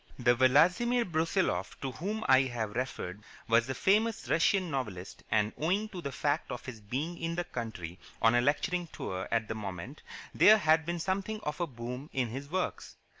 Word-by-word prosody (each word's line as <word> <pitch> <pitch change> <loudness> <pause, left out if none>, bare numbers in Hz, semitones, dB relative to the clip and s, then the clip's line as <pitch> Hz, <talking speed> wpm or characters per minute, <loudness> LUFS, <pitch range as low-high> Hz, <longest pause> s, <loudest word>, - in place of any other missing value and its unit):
This 120 -1 +4
Vladimir 180 - +4
Brusiloff 165 - 0
to 135 - -3
whom 205 +10 -4
I 130 0 +7
have 115 -4 -3
referred 105 -5 -4 0.3
was 115 +1 +4
the 130 - -3
famous 220 +3 +2
Russian 180 +2 +2
novelist, 105 -10 -4
and, 105 -1 +2
owing 195 +7 0
to 185 -4 -7
the 140 - -4
fact 145 +3 -1
of 125 - -6
his 115 -4 -8
being 140 +11 -4
in 165 0 -2
the 175 - -1
country 110 - -6 0.2
on 115 +1 +4
a 120 - +4
lecturing 175 +6 0
tour 95 - -5
at 115 -2 +1
the - - -2
moment, 105 - -6 0.3
there 215 +1 +7
had 160 -3 +3
been 170 0 -1
something 195 +5 -2
of 150 -3 -4
a 175 - +1
boom 125 +2 -7
in 130 -3 0
his 135 +5 -6
works. 185 +2 -3
140 Hz, 185 wpm, -31 LUFS, 115-175 Hz, 0.3 s, I